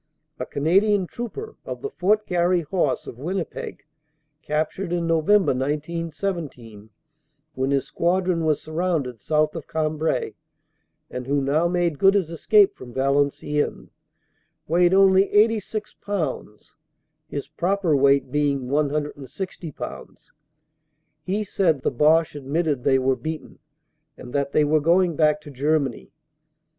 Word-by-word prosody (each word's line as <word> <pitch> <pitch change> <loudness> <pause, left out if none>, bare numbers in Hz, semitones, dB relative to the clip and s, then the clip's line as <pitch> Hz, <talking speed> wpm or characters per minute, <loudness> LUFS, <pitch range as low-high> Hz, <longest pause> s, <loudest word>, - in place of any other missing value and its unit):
A - - -4
Canadian 195 +6 +2
trooper, 325 - -7
of - - -7
the 420 - -3
Fort 210 - +1
Garry 175 0 +2
Horse, 155 -3 -1
of 120 - -9
Winnipeg, 175 +4 -5 0.6
captured 155 +4 -2
in 175 -1 0
November, 165 +2 +3
1917, 150 - -4 0.6
when 130 +1 -1
his 140 -2 +1
squad 180 +2 0
ron 170 -3 +1
was 155 -2 +1
surrounded 155 - -2
south 155 - +1
of 165 - -7
Cambrai, 155 0 -1 0.8
and 125 0 -6
who 140 +1 +1
now 145 +5 +1
made 175 -4 0
good 195 +1 +5
his 180 -5 0
escape 400 - +4
from 120 -2 -12
Valenciennes, 140 +2 0 0.8
weighed 175 +3 +3
only 195 0 +5
86 215 0 +1
pounds, 155 - -4 0.5
his 140 - -5
proper 175 +1 0
weight 140 0 +3
being 140 -3 0
160 150 +4 -3
pounds. - - -9 0.9
He 195 +6 -2
said 165 -9 0
the - - +1
Boche 155 +5 +3
admitted 145 -1 -1
they 135 -1 +4
were 130 0 +2
beaten 155 +6 -7 0.6
and 125 - -10
that 140 -1 0
they 150 - +3
were 155 +1 +2
going 170 +2 +3
back 150 0 +3
to 145 - -11
Germany. 140 -2 -1
155 Hz, 130 wpm, -23 LUFS, 140-185 Hz, 0.9 s, good